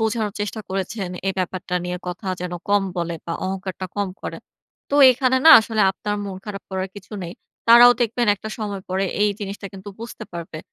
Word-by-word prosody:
বোঝানোর 220 Hz, -2 st, 0 dB
চেষ্টা 210 Hz, +1 st, -3 dB
করেছেন, 190 Hz, 0 st, -3 dB, 0.2 s
এই 195 Hz, -, +2 dB
ব্যাপারটা 185 Hz, 0 st, -3 dB
নিয়ে 180 Hz, 0 st, -3 dB
কথা 180 Hz, +2 st, -6 dB
যেন 180 Hz, -1 st, -4 dB, 0.2 s
কম 205 Hz, -1 st, +4 dB
বলে, 170 Hz, -1 st, -2 dB
বা 165 Hz, -, -3 dB
অহংকারটা 190 Hz, 0 st, -4 dB
কম 200 Hz, -1 st, 0 dB
করে। -, -, -5 dB, 0.5 s
তো -, -, 0 dB, 0.2 s
এখানে 260 Hz, +1 st, +2 dB
না, -, -, +11 dB
আসলে 220 Hz, -1 st, -2 dB
আপনার 205 Hz, +2 st, -4 dB
মন 195 Hz, -2 st, -5 dB
খারাপ 205 Hz, -1 st, -6 dB
করার 190 Hz, 0 st, -2 dB
কিছু 195 Hz, +1 st, -12 dB
নেই। 170 Hz, -, -7 dB, 0.4 s
তারাও 240 Hz, +1 st, +10 dB
দেখবেন 235 Hz, 0 st, +1 dB
একটা 215 Hz, +2 st, -8 dB
সময় 200 Hz, -3 st, -4 dB
পরে, 190 Hz, +1 st, 0 dB, 0.2 s
এই 210 Hz, -, +4 dB
জিনিসটা 200 Hz, 0 st, -6 dB
কিন্তু 195 Hz, +1 st, -10 dB
বুঝতে 230 Hz, -1 st, -7 dB
পারবে। 165 Hz, -2 st, -7 dB
195 Hz, 190 wpm, -22 LUFS, 185-215 Hz, 0.5 s, না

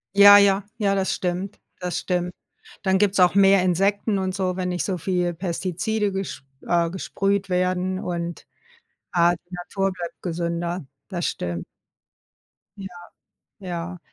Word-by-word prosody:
Ja, 205 Hz, 0 st, +10 dB
ja, 200 Hz, 0 st, +4 dB
ja, 200 Hz, -3 st, +1 dB
das 190 Hz, -1 st, 0 dB
stimmt, 185 Hz, +2 st, -3 dB, 0.2 s
das 180 Hz, -1 st, -2 dB
stimmt. 180 Hz, -1 st, -1 dB, 0.5 s
Dann 190 Hz, -1 st, +3 dB
gibt's 200 Hz, 0 st, +2 dB
auch 180 Hz, +1 st, +5 dB
mehr 195 Hz, -1 st, +6 dB
Insekten 195 Hz, +3 st, +1 dB
und 190 Hz, 0 st, -1 dB
so, 185 Hz, -1 st, -1 dB
wenn 180 Hz, -1 st, -1 dB
nicht 180 Hz, -1 st, -1 dB
so 190 Hz, -2 st, -1 dB
viele 175 Hz, 0 st, 0 dB
Pestizide 190 Hz, +4 st, -2 dB
gesp 190 Hz, -9 st, -5 dB, 0.2 s
äh, 170 Hz, -1 st, +2 dB
gesprüht 195 Hz, +2 st, -1 dB
werden 185 Hz, +1 st, 0 dB
und, 170 Hz, -1 st, -4 dB, 0.7 s
äh, 175 Hz, 0 st, +4 dB
die 175 Hz, +2 st, -19 dB
Natur 195 Hz, +2 st, -2 dB
bleibt 175 Hz, -2 st, -7 dB
gesünder. 170 Hz, -1 st, -3 dB, 0.2 s
Das 175 Hz, -4 st, -2 dB
stimmt. 85 Hz, -1 st, -3 dB, 1.1 s
Ja, 195 Hz, -1 st, -6 dB, 0.7 s
ja. 180 Hz, -2 st, -5 dB
185 Hz, 140 wpm, -23 LUFS, 175-195 Hz, 1.1 s, Ja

